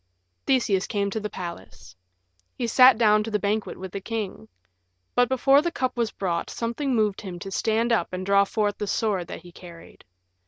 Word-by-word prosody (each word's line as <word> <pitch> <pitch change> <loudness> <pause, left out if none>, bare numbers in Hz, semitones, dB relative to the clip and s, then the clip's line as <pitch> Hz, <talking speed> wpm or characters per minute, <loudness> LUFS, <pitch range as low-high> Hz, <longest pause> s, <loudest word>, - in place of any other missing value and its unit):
Theseus 220 -8 +2
came 200 -2 -1
to 220 - -2
the 210 0 -4
palace. 95 - -9 0.6
He 245 - -1
sat 255 +1 +6
down 215 -2 +4
to 225 - -5
the 210 - +1
banquet 210 +1 -2
with 190 -1 -8
the 200 - -5
king. 210 - -5 0.7
But 245 -1 +3
before 270 +2 +4
the 345 +2 -2
cup 255 -4 -2
was 235 -2 0
brought 175 -5 -3
something 245 +3 -2
moved 210 -3 +1
him 185 -3 -7
to 195 +2 -8
stand 225 +4 0
up 230 - +1
and 185 0 -4
draw 200 0 +4
forth 205 -1 -1
the 210 - -3
sword 195 -4 -1
that - - -8
he 175 - -13
carried. 170 -1 -14
210 Hz, 195 wpm, -25 LUFS, 190-235 Hz, 0.7 s, sat